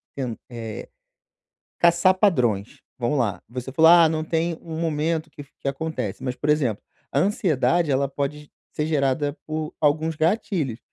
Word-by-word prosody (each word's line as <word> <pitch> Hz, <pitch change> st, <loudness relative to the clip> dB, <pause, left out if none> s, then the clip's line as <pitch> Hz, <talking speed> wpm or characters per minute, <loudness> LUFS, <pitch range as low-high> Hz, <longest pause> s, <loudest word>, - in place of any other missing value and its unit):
ten 125 Hz, -4 st, -3 dB
eh, 115 Hz, -3 st, -7 dB, 0.9 s
caçar 170 Hz, +2 st, +5 dB
padrões. 125 Hz, -, +1 dB, 0.2 s
Vamos 125 Hz, +3 st, 0 dB
lá, 110 Hz, -6 st, -1 dB
você 125 Hz, +2 st, -6 dB
falou: 160 Hz, +3 st, +6 dB
"Ah 170 Hz, -2 st, +8 dB
não 155 Hz, 0 st, -1 dB
tem 165 Hz, +1 st, 0 dB
um 160 Hz, -1 st, -6 dB
momento 160 Hz, 0 st, -1 dB
que 150 Hz, -, -13 dB
f 140 Hz, -, -19 dB
que 140 Hz, -, -2 dB
acontece", 140 Hz, -8 st, -4 dB
mas, 125 Hz, -1 st, -3 dB
por 150 Hz, -, -3 dB
exemplo, 140 Hz, -8 st, +1 dB, 0.3 s
a -, -, +2 dB
ansiedade 175 Hz, -, +2 dB
ela 135 Hz, +1 st, +1 dB
pode 140 Hz, +2 st, -3 dB
g -, -, -26 dB, 0.2 s
ser 150 Hz, -, -2 dB
gerada 145 Hz, -1 st, 0 dB
por 155 Hz, 0 st, -4 dB
alguns 155 Hz, +2 st, +1 dB
gatilhos. 160 Hz, -, 0 dB
150 Hz, 165 wpm, -24 LUFS, 130-165 Hz, 0.9 s, Ah